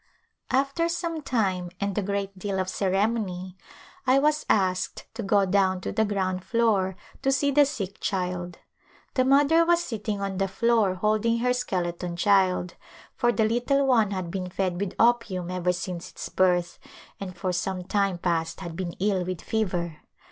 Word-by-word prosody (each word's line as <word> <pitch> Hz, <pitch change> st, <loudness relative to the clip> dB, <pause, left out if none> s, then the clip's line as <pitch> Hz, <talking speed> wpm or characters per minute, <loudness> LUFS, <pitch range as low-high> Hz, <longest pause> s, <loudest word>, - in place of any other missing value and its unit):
After 275 Hz, +6 st, +1 dB
some 335 Hz, -2 st, -2 dB
time 195 Hz, -10 st, 0 dB
and 200 Hz, -1 st, -1 dB
a 210 Hz, -, +1 dB
great 200 Hz, 0 st, -2 dB
deal 195 Hz, 0 st, -3 dB
of 185 Hz, -, -1 dB
ceremony 190 Hz, -2 st, -1 dB, 0.5 s
I 260 Hz, +1 st, +5 dB
was 300 Hz, +2 st, +2 dB
asked 185 Hz, -3 st, +1 dB
to 225 Hz, -, -5 dB
go 200 Hz, -1 st, +3 dB
down 190 Hz, -1 st, +2 dB
to -, -, -3 dB
the 220 Hz, -, +2 dB
ground 185 Hz, -3 st, -1 dB
floor 210 Hz, -6 st, +1 dB, 0.3 s
to 270 Hz, -, +2 dB
see 280 Hz, +1 st, +2 dB
the 290 Hz, 0 st, +5 dB
sick 200 Hz, -8 st, -5 dB
child. 180 Hz, -2 st, -2 dB, 0.6 s
The 255 Hz, -, +3 dB
mother 285 Hz, +5 st, +5 dB
was 345 Hz, 0 st, +3 dB
sitting 215 Hz, -6 st, -3 dB
on 195 Hz, -1 st, -3 dB
the 195 Hz, -, +1 dB
floor 215 Hz, -1 st, +2 dB
hold 215 Hz, +3 st, +1 dB
ing 230 Hz, 0 st, +3 dB
her 250 Hz, +1 st, +2 dB
skeleton 180 Hz, -7 st, -2 dB
child, 185 Hz, -1 st, +2 dB, 0.4 s
for 240 Hz, -, +2 dB
the 225 Hz, -2 st, +2 dB
little 245 Hz, +5 st, +2 dB
one 230 Hz, -6 st, +4 dB
had 185 Hz, -4 st, -4 dB
been 185 Hz, -1 st, -3 dB
fed 185 Hz, -1 st, -2 dB
with 200 Hz, -2 st, -3 dB
opium 215 Hz, -7 st, +2 dB
ever 180 Hz, 0 st, +1 dB
since 180 Hz, -1 st, -5 dB
its -, -, -7 dB
birth, 180 Hz, -2 st, +1 dB, 0.4 s
and 185 Hz, -2 st, -7 dB
for 180 Hz, +1 st, -1 dB
some 185 Hz, +1 st, -2 dB
time 195 Hz, -1 st, 0 dB
past 165 Hz, -1 st, -1 dB
had 170 Hz, -3 st, -6 dB
been 175 Hz, -1 st, -4 dB
ill 195 Hz, -1 st, 0 dB
with 180 Hz, -1 st, -4 dB
fever. 175 Hz, -7 st, -2 dB
195 Hz, 175 wpm, -26 LUFS, 185-230 Hz, 0.6 s, I